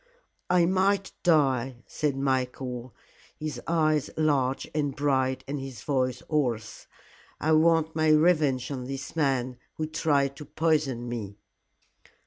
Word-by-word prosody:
"I 180 -1 +4
might 195 +2 +1
die," 135 -7 +2
said 145 -3 -2
Michael, 130 -2 -2 0.4
his 155 -1 -5
eyes 155 -3 +2
large 140 -4 +1
and 145 -3 -1
bright 130 -2 +1
and 145 +1 -3
his 135 -6 -8
voice 130 -3 -1
hoarse. 120 -8 -2 0.5
"I 155 - +1
want 160 0 +3
my 155 -1 +2
revenge 150 -5 +3
on 130 -3 -4
this 135 +3 -6
man 130 -5 0 0.2
who 155 - -2
tried 145 -3 +1
to 150 - -8
poison 150 -5 0
me." 105 -4 -5
140 Hz, 125 wpm, -27 LUFS, 130-155 Hz, 0.5 s, I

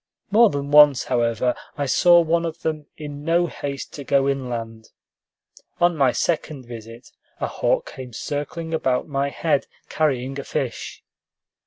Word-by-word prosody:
More 225 +2 +6
than 140 0 -4
once, 145 -3 +7
however, 120 0 +1 0.2
I 145 - -1
saw 175 +5 +5
one 165 +1 +1
of 165 -1 -5
them 155 -2 -2
in 145 -1 -7
no 170 +2 +2
haste 140 -4 -6
to 145 - -7
go 140 0 +2
inland. 115 -5 -4 0.9
On 175 -1 +3
my 135 -4 +3
second 155 -4 -2
visit, 115 +1 -10 0.3
a - - -1
hawk - - -1
came 130 -2 -8
circling 150 +7 -4
about 130 -5 0
my 140 -1 -1
head, 150 -1 0 0.2
carrying 135 -3 -1
a - - -5
fish. 135 -4 -4
140 Hz, 150 wpm, -23 LUFS, 125-160 Hz, 0.9 s, once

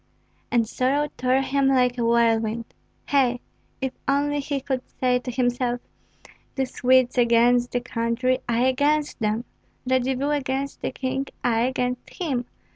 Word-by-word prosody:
And 235 -2 +2
sorrow 280 +6 0
tore 255 +1 +2
him 275 0 +1
like 250 -2 +3
a - - +1
whirlwind. 230 -1 +2 0.4
Hei! 255 -4 +2 0.4
if 265 -1 -2
only 290 +1 +1
he 280 0 -2
could 265 -1 -2 0.2
say 250 -1 +2
to 250 - -7
himself: 245 0 0 0.8
"The 270 -2 0
Swedes 255 0 +2
against 240 +1 +4
the 245 - -1
country, 245 +1 0
I 235 +1 +2
against 290 +3 +1
them! 215 +1 0 0.4
Radzivill 260 +2 +1
against 275 0 -3
the - - -1
king, 265 +1 -3 0.2
I 235 0 +2
against 250 -1 -2
him!" 270 -9 -2
255 Hz, 140 wpm, -24 LUFS, 240-270 Hz, 0.8 s, against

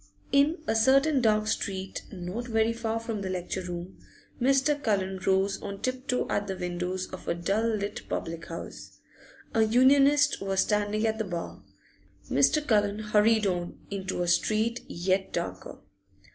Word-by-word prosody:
In 295 +4 +3
a 220 - +1
certain 270 +5 +4
dark 215 -2 +3
street 195 -3 -3
not 195 +5 -5
very 225 0 +2
far 230 -1 -2
from 225 -2 -4
the 190 - -3
lecture 185 0 -3
room 175 0 -7 0.4
Mr. 275 +3 +3
Cullen 190 -5 0
rose 195 +1 +2
on 200 -1 -6
tip 255 +2 -3
toe 250 - +1
at 205 0 -1
the 190 -1 -4
windows 180 +1 -3
of 185 - -8
a - - 0
dull 195 +6 0
little 210 -2 -3
public 165 0 -4
house. 165 - -8 0.6
A 225 - +3
Unionist 275 +6 +4
was 195 -1 +1
standing 210 +1 0
at 220 0 0
the - - +1
bar; 175 - -5 0.7
Mr. 140 - +3
Cullen 205 -4 +2
hurried 215 0 +3
on, 175 -2 -2
into 190 -2 -2
a - - -2
street 220 +6 +1
yet 185 +2 -1
darker. - - -5
210 Hz, 160 wpm, -28 LUFS, 190-230 Hz, 0.7 s, certain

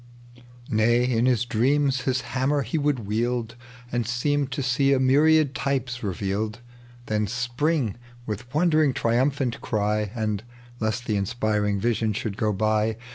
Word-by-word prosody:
Nay, 120 +3 +3
in 125 -1 +2
his 125 -2 +2
dreams 135 +3 +1
his 130 -1 +1
hammer 135 +2 0
he 125 +7 -2
would 140 -6 0
wield 115 +2 -1 0.4
And 120 -2 -1
seem 140 +3 0
to 135 +1 -3
see 135 +2 +2
a 135 - +2
myriad 145 +2 +4
tj^es 130 -4 -2
revealed, 105 +3 -2 0.5
Then 105 -2 0
spring 125 - -1 0.3
with 110 +3 -6
wondering 155 -3 +3
triumphant 130 +2 +1
ery, 105 -1 +1
And, 105 -3 -1 0.4
lest 110 +2 -2
the 105 -3 0
inspiring 105 0 0
vision 115 0 0
should 105 -1 -3
go 105 0 0
by. 110 +2 +1
120 Hz, 140 wpm, -25 LUFS, 110-135 Hz, 0.5 s, myriad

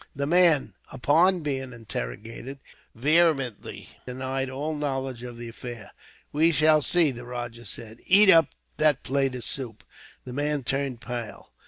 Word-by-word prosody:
The 140 0 -1
man, 165 -2 +3 0.2
upon 165 +8 +3
being 135 -4 -3
interrogated, 115 - -7 0.4
vehemently 140 -3 +1 0.2
denied 130 +1 -3
all 145 +4 -3
knowledge 135 -4 -3
of 120 -1 -8
the 120 0 -7
affair. 115 -2 -9 0.4
"We 160 +3 +3
shall 155 -1 +4
see," 165 0 +3
the 120 -1 -9
rajah 120 -1 -7
said. 110 +2 -5
"Eat 195 +1 +7
up 165 -4 +6 0.3
that 150 -3 +2
plate 135 -1 0
of 125 - -5
soup." 110 -5 -3 0.4
The 125 - -8
man 145 0 -1
turned 135 -1 -2
pale. 120 -3 -7
135 Hz, 145 wpm, -26 LUFS, 120-150 Hz, 0.4 s, Eat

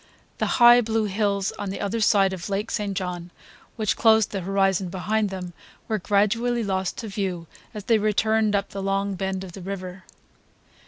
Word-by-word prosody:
The - - +1
high 240 0 +8
blue 225 -1 0
hills 200 -1 0
on 205 - -3
the 195 - -5
other 215 +3 -2
side 195 -2 +3
of 185 +1 -6
Lake 205 +3 -2
St. 200 -2 -2
John 180 -2 -4 0.5
which 215 -3 0
closed 220 -2 +4
the 195 - -3
horizon 195 0 +1
behind 210 +4 -1
them 180 -2 -6 0.3
were 215 -1 -1
gradually 230 +5 +1
lost 190 -2 -2
to 225 - -5
view 190 -4 -3 0.3
as 210 - -6
they 225 +1 +3
returned 215 0 +1
up 200 0 -1
the 195 - -6
long 195 +1 -1
bend 190 0 -3
of 185 - -9
the 190 - -10
river. 185 0 -6
200 Hz, 180 wpm, -24 LUFS, 190-215 Hz, 0.5 s, high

